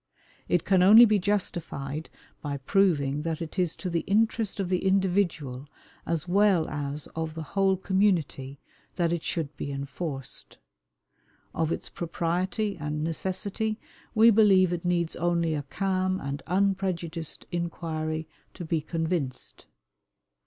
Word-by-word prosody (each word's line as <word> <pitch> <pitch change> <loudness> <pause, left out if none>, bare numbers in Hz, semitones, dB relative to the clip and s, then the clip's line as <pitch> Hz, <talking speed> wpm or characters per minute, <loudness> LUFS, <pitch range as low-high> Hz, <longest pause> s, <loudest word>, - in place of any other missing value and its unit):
It 175 - +2
can 190 -2 +4
only 215 +6 +9
be 215 -2 +3
justified 165 -7 -2 0.3
by 145 -1 -3
proving 145 -3 +2
that 160 0 -2
it 165 +3 -5
is 175 -3 +1
to 185 - -6
the 170 -1 0
interest 220 0 +1
of 195 - 0
the 180 0 0
individual 180 -9 0 0.4
as 165 0 -1
well 190 -3 +3
as 145 0 -4
of 160 -1 -3
the 160 - -4
whole 195 -1 +3
community 175 -9 0 0.4
that 170 -2 +1
it 170 - -1
should 155 -4 -3
be 140 - -4
enforced. 140 0 -6 1.0
Of 160 0 0
its - - -3
propriety 180 +5 -2
and 150 0 -3
necessity 190 +6 -2 0.4
we 225 +1 +7
believe 195 -4 +5
it 170 - -3
needs 170 -2 0
only 170 -1 +1
a 150 - -1
calm 185 +5 -1
and 140 +1 -4
unprejudiced 180 -4 -1
inquiry 160 -2 -3 0.3
to 175 - -6
be 160 -1 0
convinced. 160 -4 -3
170 Hz, 135 wpm, -27 LUFS, 155-190 Hz, 1.0 s, only